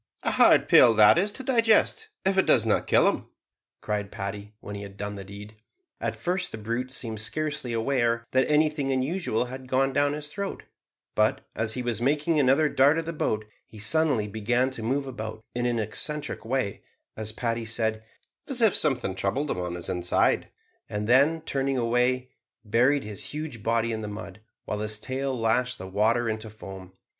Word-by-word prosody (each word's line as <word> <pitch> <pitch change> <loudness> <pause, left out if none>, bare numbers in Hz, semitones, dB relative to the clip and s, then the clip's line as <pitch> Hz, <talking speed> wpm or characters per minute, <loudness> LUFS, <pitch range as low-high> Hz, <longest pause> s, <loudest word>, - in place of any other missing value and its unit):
"A - - +1
hard - - +5
pill 115 -2 +7
that 105 -1 +8
to 205 +8 0
digest, 245 - +3 0.2
if 190 0 +2
it 190 - +3
does - - +4
not - - +1
kill - - +5
him," - - -1 0.5
cried 105 -2 -3
Paddy, 100 +2 -6
when 105 - -8
he 100 - -6
had 100 -1 -10
done 105 0 -4
the 100 -1 -7
deed. 105 +2 -11 0.4
At - - -2
first 180 +1 -2
the - - -6
brute 115 +4 -3
seemed 115 -4 -4
scarcely 145 +3 -2
aware 115 0 0
that 130 0 +2
anything 150 -2 +2
unusual 130 -1 0
had 130 +1 -8
gone 135 +1 +1
down 145 +1 +2
his 150 0 -5
throat; 200 +5 -5 0.5
but, - - +2
as 110 0 -1
he 125 - -3
was 120 -1 -2
making 150 +4 +2
another 140 +3 +4
dart 145 +2 +4
at 165 - -2
the 165 - -4
boat, 110 -8 -1 0.2
he 110 - -14
suddenly 130 -1 +1
began 120 +5 0
to 130 - -6
move 135 +5 -1
about 110 -4 -6
in 120 0 -1
an 120 -1 0
eccentric 145 +8 -3
way 120 -4 -2 0.3
as 110 0 -4
Paddy 115 0 -2
said, 110 0 -1 0.4
"as 270 -3 -1
if 225 -4 +4
something 125 -10 +1
troubled 100 +10 -1
him - - -2
in 90 -1 -3
his 85 - -6
inside," 90 -1 +1 0.4
and 105 0 -3
then, 140 +7 +4
turning 135 -3 -1
away, 125 +2 +1 0.3
buried 125 +6 +3
his 105 -2 -5
huge 150 -6 -6
body 115 +1 +1
in 110 -1 -3
the 105 - -5
mud, 105 -1 -8 0.3
while 105 - -3
his 105 0 -2
tail 130 +2 -3
lashed 125 +3 +1
the 95 - -8
water 110 +5 +1
into 110 0 -3
foam. 95 -3 -10
120 Hz, 190 wpm, -26 LUFS, 110-140 Hz, 0.5 s, that